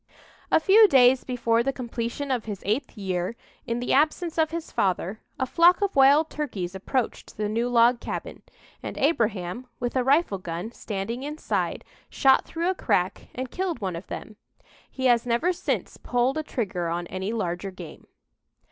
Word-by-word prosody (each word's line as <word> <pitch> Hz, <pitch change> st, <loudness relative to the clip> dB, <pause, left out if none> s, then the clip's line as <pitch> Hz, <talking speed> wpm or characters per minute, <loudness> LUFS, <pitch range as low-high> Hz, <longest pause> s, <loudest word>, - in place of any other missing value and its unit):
"A -, -, +5 dB
few 415 Hz, +6 st, +7 dB
days 260 Hz, -4 st, +5 dB
before 235 Hz, -2 st, +1 dB
the 275 Hz, -, 0 dB
completion 245 Hz, +2 st, -4 dB
of 245 Hz, -4 st, -1 dB
his 205 Hz, -3 st, -6 dB
eighth 225 Hz, +5 st, -1 dB
year, 185 Hz, +1 st, -2 dB, 0.3 s
in 235 Hz, 0 st, -1 dB
the 245 Hz, -, -1 dB
absence 315 Hz, +4 st, +1 dB
of 315 Hz, -1 st, +3 dB
his 335 Hz, 0 st, -5 dB
father, 190 Hz, +2 st, -1 dB, 0.2 s
a 260 Hz, -, 0 dB
flock 345 Hz, +6 st, +5 dB
of 400 Hz, -1 st, -1 dB
wild 280 Hz, +3 st, +6 dB
turkeys 200 Hz, -12 st, -4 dB
approached 230 Hz, +6 st, -3 dB
the 210 Hz, 0 st, -1 dB
new 230 Hz, +3 st, -1 dB
log 240 Hz, 0 st, +4 dB
cabin, -, -, -6 dB, 0.4 s
and -, -, -6 dB
Abraham, 230 Hz, -, 0 dB
with 245 Hz, +1 st, -3 dB
a 255 Hz, -, +2 dB
rifle 270 Hz, -, +2 dB
gun, 175 Hz, +4 st, -5 dB
standing 225 Hz, +2 st, -4 dB
inside, 300 Hz, +3 st, -3 dB, 0.2 s
shot 270 Hz, -1 st, +4 dB
through 340 Hz, +3 st, -1 dB
a -, -, -1 dB
crack 185 Hz, -, -1 dB
and 255 Hz, 0 st, -4 dB
killed 360 Hz, -6 st, -2 dB
one 190 Hz, -5 st, -3 dB
of 170 Hz, -, -8 dB
them. 215 Hz, -, -8 dB, 0.5 s
He 260 Hz, -, -4 dB
has 240 Hz, -1 st, +4 dB
never 245 Hz, +10 st, +2 dB
since -, -, -3 dB
pulled 250 Hz, +4 st, 0 dB
a -, -, 0 dB
trigger 200 Hz, -, -3 dB
on 175 Hz, +1 st, -2 dB
any 190 Hz, +4 st, -4 dB
larger 190 Hz, -4 st, -2 dB
game." 180 Hz, -4 st, -11 dB
240 Hz, 175 wpm, -25 LUFS, 200-280 Hz, 0.5 s, few